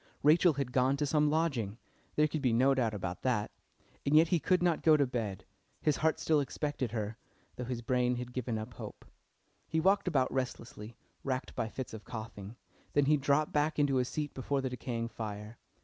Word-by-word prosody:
Rachel 160 +3 +6
had 135 -3 -3
gone 130 +2 +2
to 145 - 0
some 150 +1 +3
lodging 135 -10 0 0.4
there 150 0 +4
could 155 0 -3
be 125 -4 +2
no 130 +4 +4
doubt 115 -5 0
about 90 -3 -4
that. 120 -5 0 0.5
And 145 - +2
yet 160 +1 +6
he 175 - +3
could 180 +2 +2
not 170 -3 +2
go 155 -1 +6
to 140 - +3
bed, 115 -7 -4 0.3
his 150 - +1
heart 160 0 +1
still 155 -2 +3
expected 140 -3 -2
her, 110 -1 -3 0.4
though 125 - -5
his 120 -1 -4
brain 125 0 +2
had 125 0 -6
given 125 -3 -2
up 110 +3 -6
hope. - - -9 0.6
He 160 - 0
walked 195 +3 +3
about 135 -7 +2
restlessly, 115 -3 -4 0.3
racked 130 -1 -2
by 115 -2 -2
fits 130 0 -6
of 110 -1 -8
coughing, 110 -3 -7 0.4
then 145 -1 +4
he 150 +2 +5
dropped 145 +1 +2
back 150 +1 +1
into 145 -3 +3
his 125 -1 +1
seat 150 -2 -3
before 135 +1 -1
the 130 -1 -2
decaying 120 -2 -3
fire. 105 0 -6
130 Hz, 200 wpm, -32 LUFS, 115-150 Hz, 0.6 s, Rachel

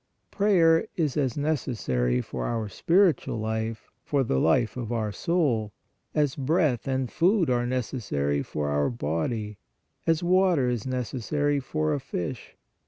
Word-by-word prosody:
Prayer 175 -6 +4
is 155 -6 0
as 135 -4 0
necessary 105 - 0
for 60 -1 -4
our 115 -2 -2
spiritual 170 - +2
life, 110 0 -3
for 140 -2 +1
the 65 - 0
life 110 - +2
of 120 -3 -4
our 110 -3 -1
soul, 120 - 0 0.4
as 145 -3 +2
breath 145 -3 +1
and 130 -2 -1
food 175 - +2
are 120 0 +1
necessary 105 - -1
for 75 -1 -3
our 75 0 +1
body, 105 +2 -3 0.5
as 165 +1 +2
water 180 -6 +3
is 120 -4 -1
neces 130 -1 -3
sary 145 +3 0
for 155 +3 -1
a 145 - -1
fish. 90 - -5
125 Hz, 145 wpm, -26 LUFS, 110-155 Hz, 0.5 s, Prayer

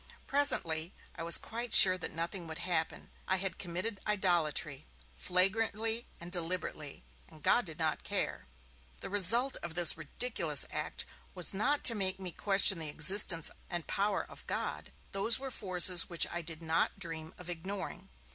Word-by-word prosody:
Presently, 175 - +1 0.2
I 170 - -10
was 170 +1 +6
quite 235 +2 -8
sure 185 -2 +8
that 180 - -7
nothing 170 +2 -5
would 160 -1 -9
happen. 170 -3 -4 0.2
I 190 - 0
had 190 -2 -4
committed 185 +4 -5
idolatry, 170 -7 -2 0.3
flagrantly 220 +5 0
and 170 +1 -11
deliberately, 170 - -4 0.3
and - - -17
God - - +2
did - - -10
not - - -3
care. - - -5 0.5
The - - -9
result 230 +7 +7
of 170 -1 -10
this 175 -2 +5
ridiculous 160 - -1
act - - -5 0.3
was 180 +1 -2
not 280 +9 -2
to 230 - +9
make 195 -3 -1
me 185 -2 -5
question 195 -1 +3
the 155 -2 0
existence 165 +1 +4 0.2
and 175 -2 -6
power 200 0 -3
of - - -16
God; - - -5 0.2
those 205 +3 +1
were 270 0 -9
forces 180 -5 +2
which 170 -2 +1
I 175 - -5
did 165 0 -5
not 165 +4 -2
dream 165 -4 -7
of 180 - -13
ignoring. 185 +2 -8
180 Hz, 160 wpm, -30 LUFS, 165-205 Hz, 0.5 s, to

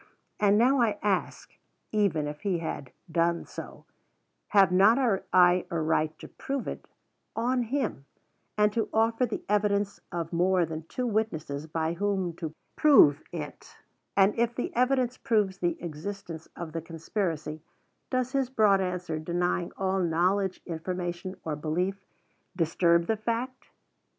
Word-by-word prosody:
And 205 0 +4
now, 255 +3 +4
I 215 -3 +2
ask, 200 -3 -1 0.4
even 200 -8 +1
if 150 0 -6
he 195 -4 0
had 150 -5 -5 0.2
done 170 +1 +1
so, - - -9 0.6
have 195 -3 +5
not 195 +6 +6 0.3
I 180 0 +5
a 170 -3 -1
right 155 0 0
to - - -10
prove 275 -1 -4
it - - -6 0.5
on 245 +2 +1
him, 235 - -2 0.5
and 210 0 +3
to 225 - -1
offer 225 +3 +2
the - - -5
evidence 205 -1 +1
of 170 -1 -4
more 180 +1 +3
than 160 0 -7
two 250 - -3
witnesses, 160 -10 -2
by 160 +1 -1
whom 190 -1 -1
to 160 -2 -5 0.2
prove 160 - +6
it; 150 -4 -8 0.4
and 195 +1 +5
if 235 0 +1
the 245 - -3
evidence 255 0 +2
proves 210 -7 +1
the 175 -2 -1
existence 170 +1 -6
of 170 -2 -6
the 165 +1 -4
conspiracy, 165 -2 -3 0.5
does 255 0 0
his 270 -2 0
broad 210 -6 +4
answer 180 -3 -2
denying 175 +2 -1
all 190 0 0
knowledge, 185 +3 +1
information, 175 +2 -4
or 155 -2 -2
belief, 180 +6 -2 0.5
disturb 170 0 +3
the 220 +3 0
fact? 240 +4 -3
185 Hz, 145 wpm, -28 LUFS, 165-215 Hz, 0.6 s, not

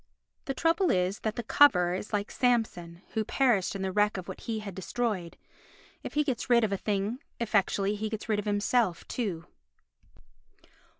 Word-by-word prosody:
The 270 - -3
trouble 335 +5 +2
is 185 +2 +1
that 220 0 -2
the 240 - -3
coverer 180 -9 +5
is 190 +3 -5
like 205 -1 -1
Samson 195 -8 0
who 220 - -1
perished 225 -5 +1
in 195 - -3
the 190 - -1
wreck 210 +1 +2
of 185 - -6
what - - -8
he 230 -2 -3
had 210 -2 -6
destroyed; 190 -1 -3 0.6
if - - -8
he 300 - +3
gets 260 -5 -3
rid 235 -1 +5
of 215 - +1
a - - +1
thing 205 +4 -2 0.2
effectually 205 -3 +1
he 215 +1 -3
gets 220 -1 -5
rid 215 -2 +1
of 210 - -4
himself 205 -2 +1
too. 185 -9 -3
210 Hz, 180 wpm, -29 LUFS, 190-235 Hz, 0.6 s, coverer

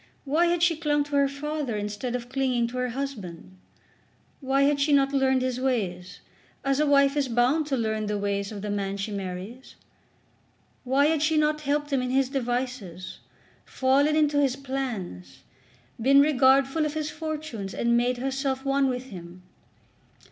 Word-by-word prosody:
Why 315 +5 +2
had 345 0 +1
she 345 -2 +4
clung 295 -2 +1
to 290 0 -5
her 280 0 +4
father 280 -4 -3
instead 210 +4 -4
of 240 -1 -5
clinging 255 -2 0
to 255 - -7
her 250 0 -1
husband? 215 -10 -6 0.8
Why 275 0 +1
had 285 0 +2
she 295 +2 +2
not 275 0 +3
learned 265 -1 +2
his 255 -1 -2
ways, 190 -9 -2 0.4
as 275 0 +1
a 300 - +2
wife 280 0 +4
is 285 -2 +1
bound 250 +6 +2
to 275 -3 0
learn 220 -2 -1
the 210 0 -1
ways 200 0 -2
of 205 -2 -7
the 210 - -3
man 200 -1 -2
she 200 +2 -4
marries? 195 +5 -7 1.1
Why 270 +3 +2
had 310 -1 +2
she 310 +1 +2
not 305 0 +1
helped 290 0 -1
him 265 - +2
in 250 - -2
his 265 0 +1
devices, 245 - -4 0.4
fallen 275 +3 +2
into 295 -2 +3
his 270 -3 +1
plans, 235 - -5 0.6
been 275 +4 +6
regardful 275 +1 +4
of 300 0 -2
his 305 -1 -2
fortunes, 305 -10 -5
and 235 0 +1
made 245 +1 +1
herself 265 +1 -2
one 275 0 +2
with 250 0 -5
him? 180 -1 -10
265 Hz, 170 wpm, -26 LUFS, 225-285 Hz, 1.1 s, been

